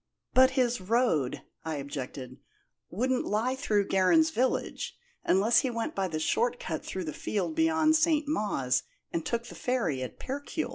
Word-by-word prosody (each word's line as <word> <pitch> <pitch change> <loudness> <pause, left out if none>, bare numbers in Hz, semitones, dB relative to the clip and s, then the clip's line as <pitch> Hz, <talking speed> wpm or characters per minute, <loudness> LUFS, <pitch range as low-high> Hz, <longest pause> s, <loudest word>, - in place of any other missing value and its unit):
"But 260 0 +6
his 245 -4 +1
road," 185 - +1 0.2
I 160 -1 -3
objected, 140 -2 -6 0.5
"wouldn't 250 +7 0
lie 230 +5 0
through 210 -7 +1
Gerrans 315 - +4
village, 260 -3 -1 0.3
unless 205 +5 +4
he 260 - 0
went 230 -1 -3
by 195 -1 -1
the 155 -3 -3
short 240 +9 +1
cut 160 -3 -4
through 190 - -4
the 155 - -4
field 210 - -2
beyond 320 -1 +3
St. 310 -2 +2
Mawes, 170 - 0 0.3
and 165 - -1
took 235 +5 -2
the - - -10
ferry 215 - -1
at 130 - -6
Percuil." 285 0 -4
230 Hz, 160 wpm, -29 LUFS, 170-260 Hz, 0.5 s, But